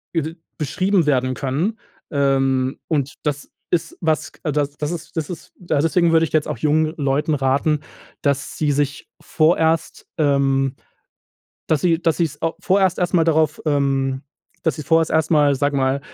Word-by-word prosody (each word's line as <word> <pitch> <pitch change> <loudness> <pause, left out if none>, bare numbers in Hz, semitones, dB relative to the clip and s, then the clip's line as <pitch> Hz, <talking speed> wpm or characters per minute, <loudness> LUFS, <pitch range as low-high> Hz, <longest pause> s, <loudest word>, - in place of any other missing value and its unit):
i 160 0 -1 0.2
beschrieben 185 +5 +1
werden 130 -2 +2
können, 155 - -1 0.3
ähm, 135 -2 +1
und 145 -3 -1
das 145 -1 -3 0.2
ist 165 -1 -1
was, 160 -3 0
das 145 -2 -1 0.2
ist 170 -2 -7
das 155 -2 -2
ist 170 -3 -9
deswegen 170 0 +2
würde 165 0 +4
ich - - -9
jetzt 155 -2 +2
auch - - -3
jungen 155 +1 +1
Leuten 145 +1 +1
raten, 140 +3 +1 0.4
dass 140 0 -1
sie 150 -2 +1
sich 145 0 -2
vorerst 160 0 +1
ähm, 135 -2 +2 0.9
dass 155 -3 +1
sie 170 -2 +2
dass 165 -3 +1
sie's 155 -4 -1
au 165 0 0
vorerst 190 -1 +2
erst 180 -1 -1
mal 165 -2 +4
darauf 155 -1 +2
ähm, 135 -2 0 0.4
dass 160 - 0
sie 155 - -5
vorher 165 +1 +3
erst 160 0 +2
mal, 145 -2 +4
sage 145 +1 0
mal, 135 +1 +1
150 Hz, 160 wpm, -21 LUFS, 140-165 Hz, 0.9 s, würde